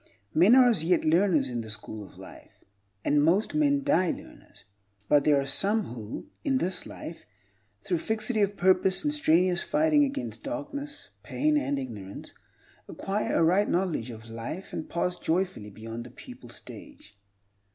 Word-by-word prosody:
Men 185 +9 +6
are 255 -1 +7
as 220 -10 +2
yet 175 +1 +2
learners 165 -3 +3
in 120 -2 -3
the 110 - -9
school 110 0 -6
of 95 - -15
life, - - -14 0.4
and 145 0 +3
most 185 - +2
men 285 -2 +2
die 270 - +3
learners. - - -9 0.4
But 145 -1 +4
there 145 -2 +5
are 135 - -2
some 200 - +1
who, 110 - -7 0.2
in 270 -2 +2
this 185 -6 -3
life, 165 - -9 0.6
through 175 -3 0
fixity 220 +3 0
of 200 0 +1
purpose 185 - +3
and 295 -1 0
strenuous 180 - +3
fighting 300 -1 +3
against 275 0 -3
darkness, 290 0 -6
pain, 305 0 0
and 215 - 0
ignorance, 105 -8 -7 0.6
acquire 200 +2 -2
a - - +4
right 185 +5 +3
knowledge 170 -10 0
of 110 -1 -10
life 115 +11 -7
and 155 - -5
pass 180 +1 -1
joyfully 170 - -1
beyond 115 +3 -7
the - - -10
pupil - - -12
stage. 105 0 -11
180 Hz, 160 wpm, -28 LUFS, -, 0.6 s, are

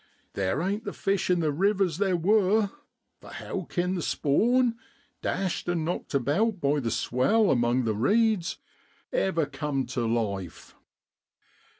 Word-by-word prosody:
Theer 100 - -1
ain't 200 +4 -2
the - - -5
fish 195 -1 -1
in 180 -1 +3
the 155 -2 +1
rivers 190 +1 +1
theer 195 -3 +2
wor, 200 +3 +2 0.5
for - - -13
how - - -6
kin 180 0 -1
the 180 - -2
spawn, 235 - +2 0.5
dashed 185 -2 -2
an' 170 -3 0
knocked 170 -3 -3
about 175 - +1
by 145 -1 +1
the 120 -4 -2
swell 185 - +2
among 120 +1 +2
the 110 -2 0
reeds, 200 - +1 0.6
ever 170 -5 +1
cum 140 -1 -3
tu 120 -1 -2
life? 100 -6 -3
170 Hz, 140 wpm, -27 LUFS, 135-200 Hz, 0.6 s, in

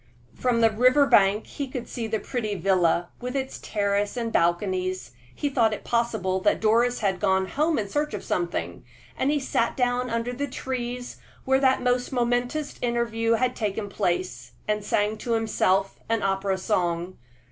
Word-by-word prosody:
From 245 -2 +1
the 225 -1 +5
river 255 +6 +5
bank 205 -3 +4
he 280 - -5
could 250 -2 -6
see 230 -2 -4
the 220 0 0
pretty 215 -2 -3
villa, 175 -2 +2
with 250 +2 -4
its 265 -1 -3
terrace 205 +1 -1
and 230 -1 -2
balconies. 185 -1 0 0.2
He 290 - -1
thought 230 -6 +2
it - - -11
possible 220 -6 0
that - - +2
Doris 235 +3 +2
had 190 -3 0
gone 190 -1 +2
home 310 +2 +1
in 210 - -1
search 295 +3 -1
of 200 - -6
something, 175 -1 -2 0.3
and 265 - 0
he 295 0 +2
sat 235 -3 0
down 250 0 +1
under 230 +1 -2
the 285 +3 -3
trees 250 -2 -4 0.3
where 265 0 +3
that 260 -2 +3
most 250 0 +1
momentous 245 +4 -1
interview 230 -1 0
had 250 +2 +1
taken 205 -1 -2
place, 180 -1 -2
and 210 -1 0
sang 210 +1 0
to 235 - -2
himself 195 -4 +1
an 225 -1 +1
opera 195 0 0
song. 180 -2 -1
225 Hz, 170 wpm, -25 LUFS, 195-250 Hz, 0.3 s, the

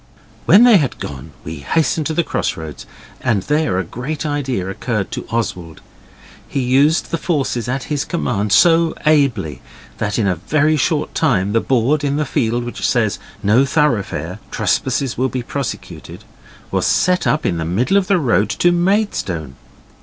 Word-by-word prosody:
When 200 +8 +7
they 240 -4 +7
had 145 -7 -1
gone 70 +2 -7
we 80 +1 -6
hastened 155 - 0
to 160 - -3
the 170 - +2
crossroads, 80 - -4 0.3
and 110 -7 0
there 150 -10 0
a 95 - 0
great 135 - -5
idea 135 -10 -2
occurred 105 0 -3
to - - -5
Oswald. 90 -8 -3 0.7
He - - -3
used 135 +5 +2
the 165 - -1
forces 135 -9 -1
at 135 +1 -2
his 145 -2 -2
command 105 - -2
so 165 +8 +4
ably 125 - +1 0.4
that 105 -2 -1
in 110 - +1
a 90 -3 +1
very 150 - +1
short 150 +1 0
time 105 - +1
the 115 - +3
board 135 +4 +1
in 140 -1 0
the 150 - 0
field 120 -4 0
which 120 - -7
says 110 -4 +1 0.2
'No 110 +6 +4
thoroughfare. 105 - 0
Trespassers 130 -1 -1
will 130 +1 +1
be 125 -1 -4
prosecuted' 140 0 -6 0.5
was - - +1
set 180 0 +2
up 150 0 +1
in 85 - 0
the 80 - -2
middle 110 - 0
of 200 -2 +3
the 195 - +3
road 120 - +1
to 175 +9 +2
Maidstone. 175 - -1
130 Hz, 170 wpm, -18 LUFS, 100-155 Hz, 0.7 s, When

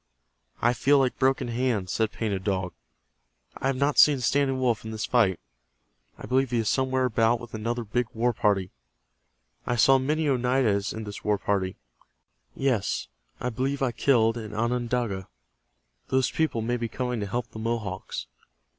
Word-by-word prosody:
"I 120 +1 +4
feel 140 +4 +3
like 130 -2 +1
Broken 130 -2 +2
Hand," 120 -5 0
said 110 +3 0
Painted 100 -4 -3
Dog. 95 -3 -1 0.8
"I - - -2
have 135 - +1
not 140 +2 +1
seen 145 -3 +7
Standing 135 +1 +1
Wolf 125 -3 +1
in 110 - -6
this 110 0 -3
fight. 105 -8 +2 0.8
I - - -9
believe 130 0 +1
he 120 - 0
is 115 -2 0
somewhere 130 -1 +1
about 115 0 +2
with 120 -1 -11
another 115 +2 -2
big 120 +3 -1
war 120 +2 +1
party. 100 -4 +1 1.0
I 125 - +1
saw 135 +3 +5
many 150 +4 0
Oneidas 125 -6 +1
in 110 - -5
this 105 -1 -8
war 105 -1 +2
party. 95 -2 -1 0.8
Yes, 125 -8 0 0.3
I 125 - -2
believe 135 +4 -1
I 130 - +1
killed 115 -2 +2
an 110 -2 -7
Onondaga. 120 -4 -1 0.8
Those 130 -1 +1
people 155 -8 0
may 120 +2 0
be 120 -1 -2
coming 125 +1 -3
to 100 - -3
help 120 +5 -3
the 110 - -8
Mohawks. 105 - -3
120 Hz, 165 wpm, -26 LUFS, 110-130 Hz, 1.0 s, seen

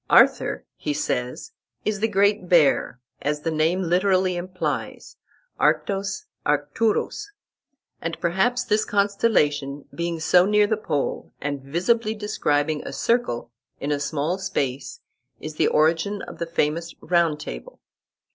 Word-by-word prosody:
"Arthur," - - +4
he 145 - -2
says, 125 -4 -2 0.3
"is 210 -1 0
the 220 - +2
Great 200 -2 +2
Bear, 150 -6 +3 0.2
as 150 +1 -1
the 165 - -1
name 160 +4 +1
literally 185 +1 +2
implies 185 +1 -4 0.4
(Arctos, 195 -1 +1 0.2
Arcturus), 205 - 0 0.7
and 165 0 -4
perhaps 215 +9 +1
this 215 -2 +2
constellation, 150 -9 +1
being 170 -1 -2
so 180 +3 +4
near 210 0 +4
the 220 - +1
pole, 150 -9 -3
and 145 -1 -3
visibly 210 - 0
describing 155 -8 0
a - - -6
circle 230 - 0 0.3
in 145 - -2
a 145 - +1
small 150 +5 -1
space, 135 -7 -3 0.4
is 155 0 -7
the - - +3
origin 165 +6 +2
of - - -9
the 170 - -2
famous 165 +1 -1
Round 170 -3 +2
Table." - - -8
170 Hz, 130 wpm, -24 LUFS, 150-200 Hz, 0.7 s, Arthur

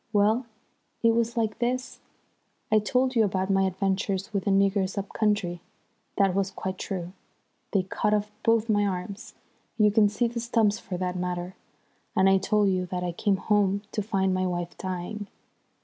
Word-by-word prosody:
Well, 215 +4 +2 0.6
it 230 0 +5
was 235 +1 0
like 220 -2 0
this. 250 +1 -2 0.7
I 215 - +6
told 255 +5 +1
you 225 - +5
about 190 -1 0
my 195 0 +3
adventures 195 +1 -1
with 195 -2 -1
the - - +1
niggers 195 0 +2
up 200 0 -3
country. 200 -5 0 0.6
That 195 -2 +3
was 195 0 0
quite 190 -1 -5
true. 180 -2 -4 0.6
They 195 -3 +2
cut 200 +3 -1
off 210 0 0
both 230 -1 +2
my 205 -2 +3
arms 200 +5 -5 0.4
you 210 -2 +5
can 210 0 +4
see 210 +4 0
the 235 0 -4
stumps 225 -3 +1
for 180 - -5
that 180 0 -2
matter. 180 0 -3 0.6
And 190 - +4
I 195 0 +5
told 205 +1 +2
you 185 -1 0
that 180 0 -3
I 175 - -1
came 195 +3 +1
home 200 -1 +1
to 210 - -1
find 195 -2 0
my 185 0 0
wife 175 -1 -3
dying. 190 +3 -5
200 Hz, 180 wpm, -27 LUFS, 185-215 Hz, 0.7 s, I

